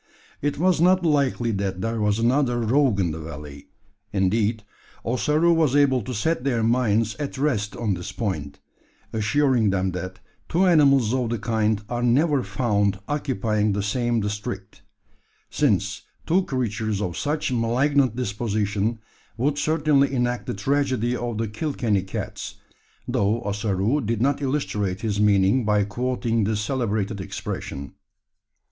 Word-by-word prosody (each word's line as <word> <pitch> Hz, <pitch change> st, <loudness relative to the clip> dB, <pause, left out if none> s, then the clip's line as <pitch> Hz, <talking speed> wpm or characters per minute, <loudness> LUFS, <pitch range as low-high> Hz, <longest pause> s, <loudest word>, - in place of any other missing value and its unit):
It 145 Hz, 0 st, -1 dB
was 175 Hz, 0 st, +2 dB
not 180 Hz, +1 st, +4 dB
likely 140 Hz, -6 st, +1 dB
that 95 Hz, -2 st, -2 dB
there 115 Hz, +1 st, -2 dB
was 105 Hz, 0 st, +2 dB
another 120 Hz, +1 st, +2 dB
rogue 120 Hz, -1 st, +2 dB
in 90 Hz, -4 st, +1 dB
the 80 Hz, -, -5 dB
valley. 75 Hz, -2 st, -9 dB, 0.4 s
Indeed, 105 Hz, +2 st, +1 dB, 0.4 s
Ossaroo 150 Hz, +8 st, +2 dB
was 155 Hz, -5 st, +2 dB
able 135 Hz, -3 st, +4 dB
to 120 Hz, +5 st, -5 dB
set 140 Hz, +6 st, 0 dB
their 120 Hz, -5 st, 0 dB
minds 115 Hz, -2 st, +2 dB
at 145 Hz, -2 st, -4 dB
rest 125 Hz, -8 st, 0 dB
on 110 Hz, -4 st, -1 dB
this 90 Hz, +2 st, -5 dB
point 75 Hz, -10 st, -4 dB, 0.5 s
assuring 120 Hz, 0 st, +2 dB
them 95 Hz, -1 st, 0 dB
that 95 Hz, +1 st, -6 dB, 0.3 s
two 180 Hz, +3 st, +3 dB
animals 140 Hz, -, +4 dB
of 125 Hz, -3 st, 0 dB
the 120 Hz, -, -1 dB
kind 110 Hz, -1 st, 0 dB
are 120 Hz, +1 st, -3 dB
never 140 Hz, +4 st, +3 dB
found 105 Hz, -6 st, 0 dB
occupying 110 Hz, -8 st, 0 dB
the 100 Hz, 0 st, -1 dB
same 120 Hz, +2 st, 0 dB
district: 105 Hz, 0 st, -5 dB, 0.7 s
since 100 Hz, -7 st, +1 dB, 0.2 s
two 180 Hz, +3 st, +2 dB
creatures 110 Hz, -5 st, -2 dB
of 90 Hz, -5 st, -3 dB
such 150 Hz, -1 st, -1 dB
malignant 125 Hz, +2 st, +2 dB
dispositions 105 Hz, -1 st, -1 dB, 0.4 s
would 140 Hz, +4 st, 0 dB
certainly 145 Hz, -3 st, +2 dB
enact 125 Hz, -2 st, -1 dB
the -, -, -2 dB
tragedy 130 Hz, +1 st, 0 dB
of 120 Hz, -2 st, -3 dB
the 115 Hz, 0 st, -1 dB
Kilkenny 110 Hz, -3 st, -1 dB
cats 95 Hz, -, -6 dB, 0.5 s
though 105 Hz, +4 st, 0 dB
Ossaroo 105 Hz, +5 st, 0 dB
did 115 Hz, -2 st, -1 dB
not 140 Hz, +4 st, +1 dB
illustrate 105 Hz, -9 st, -1 dB
his 105 Hz, -3 st, -1 dB
meaning 105 Hz, +4 st, +4 dB
by 105 Hz, -1 st, +2 dB
quoting 115 Hz, +1 st, -1 dB
this 105 Hz, 0 st, 0 dB
celebrated 110 Hz, -4 st, -1 dB
expression. 70 Hz, -5 st, -6 dB
115 Hz, 140 wpm, -24 LUFS, 105-135 Hz, 0.7 s, not